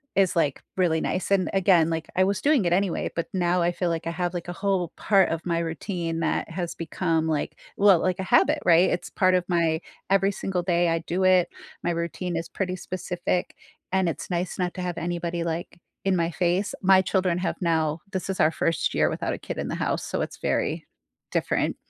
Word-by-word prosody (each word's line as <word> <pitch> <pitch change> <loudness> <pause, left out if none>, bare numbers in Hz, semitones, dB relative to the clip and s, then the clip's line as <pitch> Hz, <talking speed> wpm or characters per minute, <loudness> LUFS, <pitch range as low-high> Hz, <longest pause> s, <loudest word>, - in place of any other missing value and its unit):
is, 190 -2 +3
like, 150 -5 +1 0.2
really 170 -3 +2
nice 185 - -2
and 195 -2 +3
again, 180 -4 +4
like, 165 0 -3
I 185 - +4
was 195 0 -1
doing 285 -8 +3
it 175 - +2
anyway, 190 -1 0
but 170 - -2
now 180 -1 +1
I 170 +1 +2
feel 175 0 -1
like 165 0 -2
I - - -1
have, 175 +1 -2
like, 175 -1 -5
a - - -3
whole 190 -2 -1
part 195 -3 +3
of 165 0 -3
my 170 -1 0
routine 165 0 -3
that 165 - -1
has 170 0 -4
become, 165 -1 -1
like, 155 -2 -1 0.2
well, 200 -3 +6
like 185 +1 0
a - - -1
habit, - - +3
right? 175 +1 +6
It's 180 - -2
part 185 0 +3
of 180 -1 +1
my 165 -2 +2 0.3
every 195 0 +3
single 185 -2 -2
day 175 -1 +2
I 165 0 +1
do 180 +3 -1
it, 185 -1 +4 0.3
my 175 - +1
routine 170 +1 -3
is 165 0 -4
pretty 185 -2 -2
specific 180 0 -3 0.4
and 190 -2 +2
it's - - -5
nice 175 +1 -2
not 180 -1 0
to 185 - -4
have 180 -2 -3
anybody, 170 0 -2
like, 170 +1 -4 0.3
in 195 -1 +3
my 170 -1 0
face, 180 +3 0
my 190 0 +6
children 185 -2 +1
have 185 - -2
now 160 -2 +1
this 190 - -3
is 190 - -2
our 155 - +4
first 165 0 0
year - - +3
without - - -2
a - - -4
kid - - -6
in - - -2
the - - -2
house, - - -1
so - - -2
it's - - -4
very - - -1 0.4
different. - - 0
175 Hz, 220 wpm, -25 LUFS, 165-185 Hz, 0.4 s, well